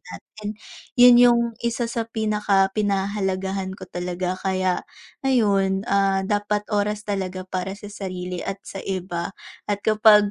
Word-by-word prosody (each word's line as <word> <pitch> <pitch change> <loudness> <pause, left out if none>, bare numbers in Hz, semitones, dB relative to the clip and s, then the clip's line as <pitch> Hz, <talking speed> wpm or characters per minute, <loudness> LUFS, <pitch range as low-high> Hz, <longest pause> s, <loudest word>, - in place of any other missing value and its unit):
natin, 215 0 -8 0.4
'yon 245 0 +9
'yong 240 -1 +6 0.2
isa 235 0 -1
sa 230 -1 -2
pinakapinahahalagahan 195 -2 0
ko - - -9
talaga 180 +1 -2
kaya 185 -1 0 0.5
ayun, 200 -6 +2
ah, 195 -1 +3
dapat 205 +1 0
oras 210 +1 0
talaga 190 -2 -3
para 185 +1 -4
sa 205 0 -10
sarili 185 -3 -5
at 195 0 -4
sa 195 - -7
iba 185 -1 -3 0.3
at 205 -1 0
kapag 210 -1 +6
195 Hz, 130 wpm, -23 LUFS, 190-210 Hz, 0.5 s, yon